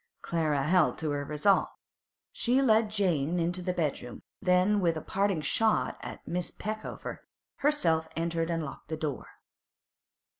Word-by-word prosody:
Clara 155 -4 0
held 170 +2 +3
to 155 -2 -2
her 145 0 -1
resolve. 150 +7 +2 0.6
She 245 +2 +2
led 220 -4 +4
Jane 180 -6 +1
into 175 +2 0
the 180 - -1
bedroom, 150 -8 -3 0.2
then, 185 +2 +3
with 170 -4 +1
a - - -4
parting 195 -2 0
shot 220 +7 +1
at - - -9
Miss 175 0 -2
Peckover, 215 +1 -6 0.4
herself 170 - +2
entered 165 0 -1
and 165 -2 -1
locked 140 - -10
the 160 - -3
door. 150 -3 -4
170 Hz, 145 wpm, -29 LUFS, 155-200 Hz, 0.6 s, led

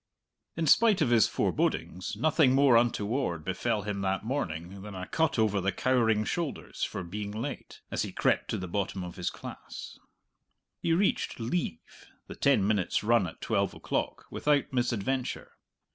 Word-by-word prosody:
In 165 - 0
spite 215 +6 +5
of 125 - +1
his 115 -3 +6
forebodings, 90 +1 -1
nothing 150 -4 +4
more 135 -3 +6
untoward 115 - +1
befell 105 +3 -1
him 105 -1 -3
that 95 +2 -1
morning 95 - -3
than 105 0 -8
a 90 0 -5
cut 160 - 0
over 105 -3 +2
the 100 +2 +1
cowering 110 0 +2
shoulders 170 -5 -4
for - - -2
being 100 +4 -5
late, 110 +3 -6
as - - -1
he - - -3
crept - - +1
to - - -1
the 90 - -5
bottom 95 +1 -2
of 90 -1 -7
his 90 -2 -2
class. - - -9 0.8
He 170 - 0
reached 185 -4 +1
"leave," 115 - -4 0.2
the - - -8
ten 140 -8 +3
minutes' 105 -2 +1
run 115 -3 +3
at 80 - -11
twelve - - 0
o'clock, - - -3
without 145 -1 +1
misadventure. 125 +1 -1
110 Hz, 160 wpm, -29 LUFS, 95-135 Hz, 0.8 s, his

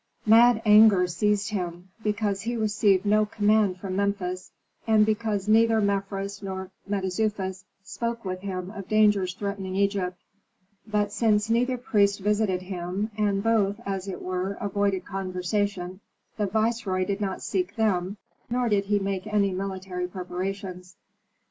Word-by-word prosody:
Mad 225 +1 +6
anger 210 -3 +7
seized 205 +4 0
him, 180 -2 -4
because 210 -2 -1
he 235 +4 -3
received 210 -3 +2
no 210 +1 +4
command 210 -2 +2
from 185 0 -5
Memphis, 195 -2 -2 0.4
and 215 -1 +5
because 215 -2 -1
neither 225 +1 +4
Mefres 200 0 -2
nor 190 -1 -5 0.2
Mentezufis 190 -1 -2 0.2
spoke 235 +2 -4
with 185 -1 -3
him 185 -1 -5
of 200 -3 -8
dangers 205 -4 +3
threatening 200 -2 -4
Egypt. 195 -2 0 0.7
But 210 -1 0
since 215 0 +2
neither 250 +2 +2
priest 210 -6 +2
visited 205 -2 0
him, 185 +3 -4
and 205 -2 0
both, 215 -2 +2
as 195 -1 -3
it 190 - -6
were, 185 +1 -2
avoided 200 -2 -1
conversation, 185 0 -2 0.4
the 210 -2 -1
viceroy 215 -3 0
did 200 +2 -3
not 190 -2 -3
seek 190 0 -2
them, 200 -3 0 0.3
nor 245 0 0
did 200 -2 +2
he 205 +1 +2
make 195 -1 -3
any 205 -2 +2
military 185 -1 -4
preparations. 180 0 -5
200 Hz, 140 wpm, -26 LUFS, 185-215 Hz, 0.7 s, anger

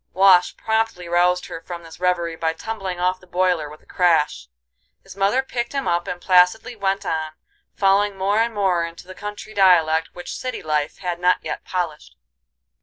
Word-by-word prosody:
Wash 185 -1 +5
promptly 220 -5 -1
roused 180 +1 +2
her 165 - -8
from 170 -1 -8
this 165 0 -13
reverie 175 -2 0
by 160 0 -1
tumbling 195 -1 -5
off 185 +1 0
the 185 - -19
boiler 180 -4 0
with 150 - -14
a - - -26
crash. 160 - +1 0.6
His - - -13
mother 200 +7 +2
picked 240 -2 -4
him 275 -1 -2
up 175 0 0
and 175 - -4
placidly 185 +7 +3
went 195 -2 -1
on, 155 -1 -2 0.4
falling 200 0 +2
more 200 +3 +1
and 230 +1 +1
more 190 -4 +1
into 170 +1 -8
the 185 - -10
country 210 +2 -8
dialect 165 -5 +4
which 175 - -7
city 255 -1 -5
life 150 -1 -1
had 175 -2 -4
not 180 +1 +3
yet - - -5
polished. 170 -5 -4
180 Hz, 180 wpm, -22 LUFS, 170-195 Hz, 0.6 s, Wash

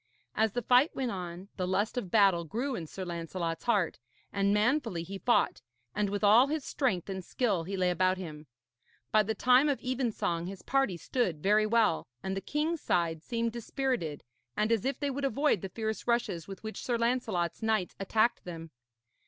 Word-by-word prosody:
As 220 -1 +1
the 245 - -2
fight 250 +7 +4
went 255 -3 -1
on, 180 0 -6
the 185 -2 -1
lust 200 +4 0
of 245 -7 -3
battle 195 -4 +4
grew 240 - -3
in 165 -6 -5
Sir 185 +4 -6
Lancelot's 170 -1 -4
heart, 205 -8 +1 0.3
and 200 0 +2
manfully 215 - +1
he 195 +3 -7
fought, 240 - +2 0.3
and 210 -1 0
with 205 +1 -3
all 220 +6 +7
his 305 -1 -2
strength 225 - -1
and 190 -1 -4
skill 200 -6 0
he 195 +2 -4
lay 180 -1 +2
about 185 +1 +2
him. 155 -4 -8 0.6
By 215 - +5
the 220 +1 -2
time 255 +4 +5
of 280 - 0
evensong 235 -9 -1
his 190 -1 -8
party 270 -10 +1
stood 170 - -1
very 215 +2 +4
well, 220 -6 +2 0.2
and 190 0 -2
the 195 - -3
king's 310 +6 -1
side 165 -2 0
seemed 230 +4 -1
dispirited 235 - -2 0.3
and 215 +2 +1
as 225 -2 +1
if 275 - -1
they 285 -1 -1
would 280 +1 -4
avoid 275 - +2
the 195 - -5
fierce 220 +3 -4
rushes 235 -9 0
with 195 0 -9
which 220 0 -6
Sir 240 -2 0
Lancelot's 230 -8 0
knights 220 -5 0
attacked 220 +4 +1
them. 165 -2 -8
210 Hz, 190 wpm, -30 LUFS, 180-245 Hz, 0.6 s, all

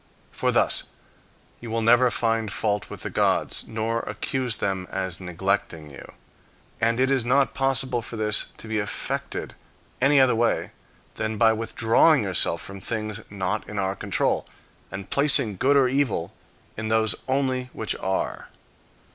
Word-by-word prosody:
For - - -1
thus - - +5 0.7
you 120 - -9
will 115 0 -1
never 120 +2 +5
find 115 -2 0
fault 105 -2 -1
with - - -9
the - - -5
gods, - - 0
nor 115 +1 -2
accuse 120 +3 -3
them 95 -2 -2
as 95 -2 -4
neglecting 85 -3 -3
you. 70 - -12 0.7
And 115 +2 +1
it 130 +1 +2
is 135 -3 +2
not 135 +3 +2
possible 135 -2 0
for 115 - -8
this 105 -1 +5
to - - -10
be 110 -1 -1
effected 105 -1 -4 0.5
any 140 +2 +5
other 130 -2 +5
way 115 +1 0 0.5
than 110 0 -2
by 110 +1 +5
withdrawing 115 +5 +3
yourself 95 -3 0
from 95 0 -8
things 110 -1 -4
not 100 +1 -3
in 105 - -6
our 95 -1 0
own 100 - -8
control, - - -1 0.4
and 95 0 -7
placing 140 -8 +3
good 140 +7 +3
or 135 -2 +4
evil 125 -10 -1 0.4
in 110 0 -4
those 110 0 +2
only 130 -1 -1
which 110 - -4
are. 95 0 -3
110 Hz, 155 wpm, -24 LUFS, 105-125 Hz, 0.7 s, thus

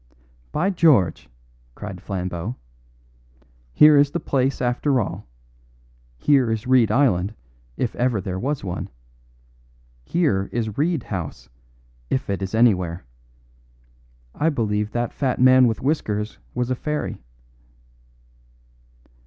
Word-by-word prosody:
"By 180 +6 +1
George!" 150 - +3 0.5
cried 95 -4 -8
Flambeau; 90 +2 -4 1.2
"here 150 - +7
is 140 0 +5
the - - -3
place, 135 0 0
after 125 +2 +1
all! 105 - -4 0.9
Here 135 - +3
is 110 -1 -2
Reed 125 -3 +4
Island, 110 -7 +2 0.4
if 120 - -2
ever 120 -3 +1
there 95 0 -4
was 140 +5 -2
one. 90 -3 -4 1.1
Here 100 - 0
is 110 -3 -2
Reed 155 -2 0
House, 90 - -6 0.6
if 130 -6 -1
it 100 - -2
is 95 +2 -3
anywhere. 90 - +2 1.3
I 160 - +1
believe 105 -7 -1
that 120 +1 -2
fat 135 -3 -1
man 130 0 +6
with 110 - -2
whiskers 110 -8 -1 0.2
was 125 +1 -1
a - - +1
fairy." 150 - -4
120 Hz, 115 wpm, -22 LUFS, 100-135 Hz, 1.3 s, here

